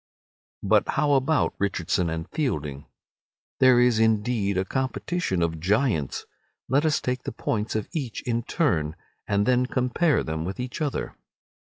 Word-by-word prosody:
But -, -, +3 dB
how 150 Hz, -1 st, +1 dB
about 140 Hz, +3 st, +2 dB
Richardson 90 Hz, -3 st, 0 dB
and 80 Hz, +1 st, -4 dB
Fielding? 75 Hz, -, -3 dB, 0.7 s
There 130 Hz, -2 st, +6 dB
is 120 Hz, -2 st, +4 dB
indeed 110 Hz, -2 st, +1 dB
a 95 Hz, -, +1 dB
competition 130 Hz, -, -1 dB
of 80 Hz, -1 st, -1 dB
giants. 100 Hz, -, 0 dB, 0.4 s
Let 140 Hz, +4 st, +2 dB
us 155 Hz, -1 st, +2 dB
take 125 Hz, 0 st, -2 dB
the -, -, -5 dB
points 105 Hz, 0 st, -2 dB
of 110 Hz, -, -1 dB
each 135 Hz, -8 st, -4 dB
in 120 Hz, -1 st, 0 dB
turn, 80 Hz, -, 0 dB, 0.3 s
and 100 Hz, 0 st, +2 dB
then 125 Hz, 0 st, +3 dB
compare 130 Hz, +6 st, +1 dB
them 80 Hz, 0 st, -3 dB
with 95 Hz, +6 st, -5 dB
each 125 Hz, +5 st, -5 dB
other. 145 Hz, -3 st, -2 dB
115 Hz, 150 wpm, -25 LUFS, 95-130 Hz, 0.7 s, There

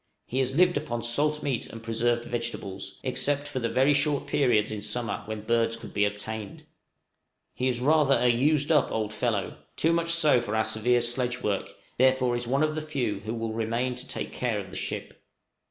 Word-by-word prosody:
He 130 Hz, -, -2 dB
has 130 Hz, 0 st, +1 dB
lived 180 Hz, 0 st, +4 dB
upon 120 Hz, -6 st, -3 dB
salt 150 Hz, +6 st, +1 dB
meat 130 Hz, -5 st, -1 dB
and 115 Hz, 0 st, -10 dB
preserved 120 Hz, +1 st, 0 dB
vegetables, 115 Hz, -5 st, -4 dB
except 145 Hz, 0 st, 0 dB
for 145 Hz, -3 st, -3 dB
the 115 Hz, -1 st, -1 dB
very 135 Hz, +3 st, +3 dB
short 145 Hz, 0 st, +1 dB
periods 125 Hz, -7 st, +2 dB
in 105 Hz, -1 st, -4 dB
summer 110 Hz, +1 st, -3 dB
when 110 Hz, 0 st, -5 dB
birds 115 Hz, +1 st, +1 dB
could -, -, -10 dB
be 105 Hz, -, +3 dB
obtained. 105 Hz, 0 st, -5 dB, 0.9 s
He 130 Hz, -, -1 dB
is 125 Hz, -2 st, 0 dB
rather 145 Hz, +1 st, +4 dB
a 120 Hz, -, +1 dB
"used 145 Hz, +5 st, +3 dB
up" 150 Hz, -3 st, +3 dB
old 110 Hz, -1 st, -2 dB
fellow, 105 Hz, -4 st, -1 dB, 0.2 s
too 165 Hz, +1 st, +2 dB
much 170 Hz, 0 st, 0 dB
so 155 Hz, -7 st, +4 dB
for 110 Hz, -2 st, -3 dB
our 110 Hz, -, +2 dB
severe 110 Hz, +3 st, +2 dB
sledge 120 Hz, +1 st, -1 dB
work, 100 Hz, -2 st, -1 dB, 0.3 s
therefore 130 Hz, -1 st, +3 dB
is 120 Hz, 0 st, -4 dB
one 135 Hz, +4 st, +2 dB
of 155 Hz, 0 st, +1 dB
the 155 Hz, -, -3 dB
few 125 Hz, -10 st, -2 dB
who 110 Hz, +3 st, -5 dB
will 115 Hz, -1 st, -3 dB
remain 115 Hz, +3 st, -1 dB
to 125 Hz, +2 st, -5 dB
take -, -, -5 dB
care 120 Hz, -4 st, -1 dB
of 100 Hz, -, -8 dB
the -, -, -9 dB
ship. -, -, -5 dB
120 Hz, 200 wpm, -27 LUFS, 110-140 Hz, 0.9 s, lived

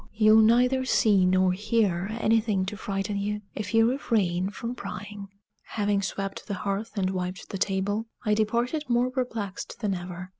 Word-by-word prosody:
You'll 215 Hz, 0 st, +6 dB
neither 250 Hz, +4 st, +4 dB
see 205 Hz, -7 st, +3 dB
nor 185 Hz, 0 st, +3 dB
hear 200 Hz, -3 st, 0 dB
anything 215 Hz, -4 st, +2 dB
to 205 Hz, +3 st, -5 dB
frighten 200 Hz, 0 st, -3 dB
you 210 Hz, +1 st, -2 dB
if 210 Hz, -1 st, -5 dB
you 225 Hz, 0 st, +5 dB
refrain 200 Hz, -8 st, 0 dB
from 230 Hz, +4 st, -5 dB
prying." 205 Hz, -4 st, -7 dB, 0.3 s
Having 205 Hz, -2 st, -1 dB
swept 195 Hz, 0 st, -4 dB
the 200 Hz, -, -2 dB
hearth 200 Hz, +4 st, -3 dB
and 190 Hz, -1 st, +1 dB
wiped 180 Hz, 0 st, -4 dB
the 195 Hz, -, -5 dB
table, 205 Hz, +3 st, -1 dB, 0.2 s
I 210 Hz, -, +3 dB
departed 235 Hz, +8 st, 0 dB
more 245 Hz, +1 st, +2 dB
perplexed 230 Hz, -8 st, -4 dB
than 205 Hz, -3 st, 0 dB
ever. 180 Hz, 0 st, -6 dB
205 Hz, 160 wpm, -27 LUFS, 190-225 Hz, 0.3 s, You'll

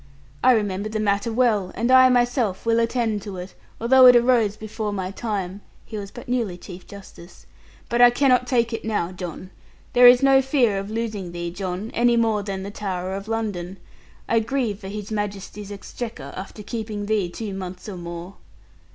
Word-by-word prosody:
I 255 Hz, -, +7 dB
remember 205 Hz, -2 st, -1 dB
the 215 Hz, 0 st, -3 dB
matter 205 Hz, +1 st, 0 dB
well, 220 Hz, -6 st, +1 dB
and 235 Hz, +3 st, 0 dB
I 260 Hz, 0 st, +8 dB
myself 240 Hz, -5 st, +1 dB
will 230 Hz, 0 st, +3 dB
attend 230 Hz, -2 st, 0 dB
to 195 Hz, -2 st, -7 dB
it, 180 Hz, +1 st, -8 dB, 0.3 s
although 255 Hz, +2 st, +7 dB
it 250 Hz, -, +9 dB
arose 235 Hz, -4 st, +3 dB
before 215 Hz, 0 st, -4 dB
my 190 Hz, -2 st, -3 dB
time' 200 Hz, -3 st, -4 dB, 0.2 s
he 220 Hz, -, -9 dB
was 200 Hz, -2 st, -5 dB
but 245 Hz, -, -11 dB
newly 235 Hz, -7 st, -1 dB
Chief 180 Hz, 0 st, -11 dB
Justice 190 Hz, -3 st, -13 dB, 0.4 s
'but 240 Hz, +1 st, +1 dB
I 245 Hz, -, +9 dB
cannot 250 Hz, 0 st, +2 dB
take 235 Hz, -2 st, +1 dB
it 225 Hz, -, -4 dB
now, 205 Hz, -6 st, -1 dB
John. 185 Hz, 0 st, -7 dB, 0.4 s
There 245 Hz, 0 st, +8 dB
is 245 Hz, +2 st, +7 dB
no 270 Hz, -1 st, +6 dB
fear 255 Hz, -7 st, +2 dB
of 195 Hz, +1 st, -6 dB
losing 215 Hz, -5 st, -4 dB
thee, 175 Hz, 0 st, -4 dB
John, 185 Hz, +3 st, -5 dB
any 240 Hz, 0 st, +3 dB
more 225 Hz, -2 st, +2 dB
than 195 Hz, -1 st, -5 dB
the 200 Hz, -, -6 dB
Tower 190 Hz, -3 st, -4 dB
of 195 Hz, +2 st, -6 dB
London. 200 Hz, -5 st, -3 dB, 0.5 s
I 230 Hz, -, +3 dB
grieve 225 Hz, -3 st, -2 dB
for 190 Hz, -, -9 dB
His 210 Hz, +1 st, -6 dB
Majesty's 205 Hz, -1 st, -5 dB
exchequer, 205 Hz, -, -7 dB
after 195 Hz, +3 st, -8 dB
keeping 215 Hz, -2 st, -5 dB
thee 205 Hz, -4 st, 0 dB
two 205 Hz, +3 st, -6 dB
months 185 Hz, 0 st, -7 dB
or 205 Hz, -, -6 dB
more.' 175 Hz, +1 st, -8 dB
210 Hz, 185 wpm, -23 LUFS, 195-235 Hz, 0.5 s, it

